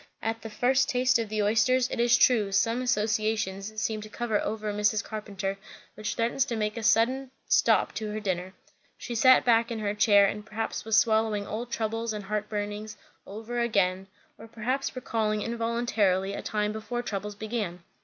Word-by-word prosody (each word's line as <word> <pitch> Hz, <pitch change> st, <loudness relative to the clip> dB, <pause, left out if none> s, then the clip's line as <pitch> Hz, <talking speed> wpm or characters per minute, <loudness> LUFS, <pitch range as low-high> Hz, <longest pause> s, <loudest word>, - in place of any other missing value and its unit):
At 225 Hz, 0 st, -2 dB
the 225 Hz, -, -7 dB
first 260 Hz, +5 st, +2 dB
taste 255 Hz, 0 st, +3 dB
of 225 Hz, -2 st, -3 dB
the 215 Hz, -1 st, 0 dB
oysters, 230 Hz, +4 st, +3 dB
it -, -, -3 dB
is 240 Hz, 0 st, +5 dB
true, 220 Hz, -6 st, +3 dB
some 230 Hz, +5 st, +1 dB
associations 215 Hz, -3 st, -1 dB
seemed 215 Hz, 0 st, -2 dB
to 215 Hz, -, -9 dB
come 240 Hz, +1 st, -5 dB
over 210 Hz, 0 st, -1 dB
Mrs. 210 Hz, 0 st, +1 dB
Carpenter 200 Hz, -2 st, -5 dB, 0.3 s
which 210 Hz, 0 st, -4 dB
threatened 235 Hz, +3 st, -1 dB
to 255 Hz, -3 st, +1 dB
make 210 Hz, -1 st, -1 dB
a 230 Hz, -, -4 dB
sudden 245 Hz, +5 st, +2 dB, 0.2 s
stop -, -, +3 dB
to 215 Hz, -1 st, -4 dB
her 215 Hz, +1 st, -3 dB
dinner. 185 Hz, -2 st, -3 dB, 0.4 s
She 240 Hz, -, -6 dB
sat 255 Hz, +3 st, +5 dB
back 230 Hz, -1 st, +4 dB
in 230 Hz, -, -3 dB
her 205 Hz, -1 st, -1 dB
chair, 205 Hz, -1 st, +5 dB
and 210 Hz, +2 st, -2 dB
perhaps 220 Hz, +1 st, -4 dB
was 220 Hz, -1 st, +3 dB
swallowing 220 Hz, -2 st, +2 dB
old 235 Hz, +4 st, -5 dB
troubles 225 Hz, 0 st, -2 dB
and 210 Hz, -2 st, -6 dB
heartburnings 210 Hz, +1 st, -4 dB, 0.3 s
over 225 Hz, +4 st, -5 dB
again, 195 Hz, -5 st, +1 dB, 0.3 s
or 225 Hz, -, -11 dB
perhaps 250 Hz, +5 st, -3 dB
recalling 215 Hz, -4 st, -1 dB
involuntarily 230 Hz, -5 st, 0 dB
a -, -, -4 dB
time 210 Hz, -1 st, -1 dB
before 240 Hz, +3 st, -4 dB
troubles 210 Hz, -2 st, -4 dB
began. 210 Hz, -5 st, -4 dB
215 Hz, 175 wpm, -27 LUFS, 210-230 Hz, 0.4 s, is